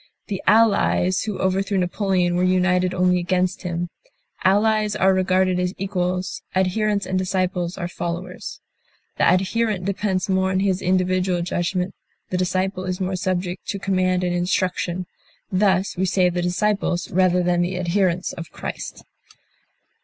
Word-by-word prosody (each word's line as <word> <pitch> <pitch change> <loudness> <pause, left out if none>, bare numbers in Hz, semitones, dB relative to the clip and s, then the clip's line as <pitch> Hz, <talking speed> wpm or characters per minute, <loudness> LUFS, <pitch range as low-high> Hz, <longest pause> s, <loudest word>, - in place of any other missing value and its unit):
The 195 -2 -3
Allies 200 -4 +3
who 210 -3 -3
overthrew 195 +1 0
Napoleon 180 -1 +1
were 180 - +1
united 185 0 +2
only 180 0 +2
against 180 +2 0
him. 175 -1 -3 0.5
Allies 210 +2 +3
are 190 -2 +4
regarded 185 -1 +2
as 180 +1 -1
equals; 185 -1 -2
adherents 200 +2 +1
and 185 - -1
disciples 185 -1 -1
are 175 -3 -3
followers. 175 +1 -5 0.6
The - - +4
adherent 195 +1 0
depends 195 -1 -1
more 190 -1 +1
on 190 0 +1
his 195 -2 +1
individual 185 -1 +1
judgment, 180 +1 -1 0.4
the 185 - 0
disciple 185 +1 -1
is 185 0 -3
more 185 0 -1
subject 180 0 -2
to 200 - -2
command 185 -2 +1
and 180 -1 0
instruction; 180 0 -1 0.5
thus 190 0 +2
we 190 +1 0
say 180 0 +3
the 175 0 -2
disciples 180 0 0
rather 180 0 +3
than 175 0 +2
the 180 +1 -1
adherents 180 0 0
of 165 -2 -8
Christ. - - -7
185 Hz, 145 wpm, -22 LUFS, 180-190 Hz, 0.6 s, are